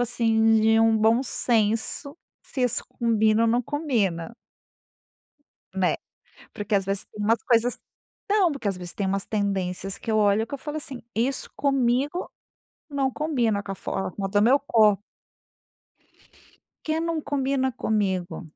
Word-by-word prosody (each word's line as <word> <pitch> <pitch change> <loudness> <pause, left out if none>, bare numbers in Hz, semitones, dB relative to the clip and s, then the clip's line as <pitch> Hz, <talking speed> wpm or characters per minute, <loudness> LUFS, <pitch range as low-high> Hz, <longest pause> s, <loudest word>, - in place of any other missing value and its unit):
assim, 225 -2 +3
de 225 0 +4
um 225 0 +4
bom 225 +4 +3
senso 230 +5 0 0.3
se 260 - -4
isso 245 -1 +1
combina 220 -1 +2
ou 230 - +3
não 240 +2 +2
combina. 230 - -1 1.4
Né, 185 -2 +1 0.6
porque 205 0 -3
às 195 - +2
vezes 195 0 -2
tem 210 - -8
umas 225 +3 +2
coisas 235 0 +2 0.5
não, 395 -5 +4
porque 275 -7 -3
às 195 - -2
vezes 180 -1 -8
tem 200 - -2
umas 195 0 -1
tendências 195 -2 -2
que 225 - -5
eu 215 - +2
olho, 210 +1 +3
que 280 - -6
eu 280 - -5
falo 300 +2 -5
assim: 265 -4 -8
"Isso 255 +5 -1
comigo, 275 +4 0 0.6
não 275 -2 0
combina 245 -10 0
com 195 - -5
a - - -4
forma 195 +1 -4
do 205 +1 +2
meu 250 +7 +5
copo". 215 -7 +3 1.8
Que 315 0 0
não 330 -1 -1
combina 270 -2 0
comigo. 190 -6 -2
225 Hz, 150 wpm, -25 LUFS, 205-265 Hz, 1.8 s, meu